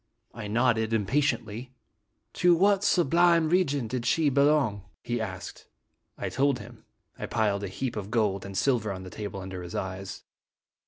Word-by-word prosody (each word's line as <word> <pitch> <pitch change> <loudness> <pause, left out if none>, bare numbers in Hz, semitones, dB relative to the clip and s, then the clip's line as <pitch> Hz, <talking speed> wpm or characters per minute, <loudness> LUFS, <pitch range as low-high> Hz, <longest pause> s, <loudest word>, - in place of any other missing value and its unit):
'' - - -51
I 110 -3 -6
nodded 115 0 +1
impatiently. 120 +1 -1 0.3
" - - -50
To 175 -1 +6
what 200 +3 +3
sublime 170 -2 +4
religion 145 -8 +1
did 125 +1 -3
she 155 +2 +3
belong?" 140 -7 +2 0.2
he 120 -1 -2
asked. 95 -5 -7 0.5
I - - -3
told 135 0 +1
him. 110 +1 -12 0.3
I - - -4
piled 105 -3 0
a - - -2
small 95 - -11
heap 130 -3 -2
of 105 -2 -5
gold 105 -5 +1
and 100 -1 -6
silver 120 -5 +1
on 95 -1 -6
the 95 - -9
table 100 -2 -6
under 95 -1 -6
his 90 -1 -8
eyes. 95 0 -5
115 Hz, 175 wpm, -27 LUFS, 100-140 Hz, 0.5 s, To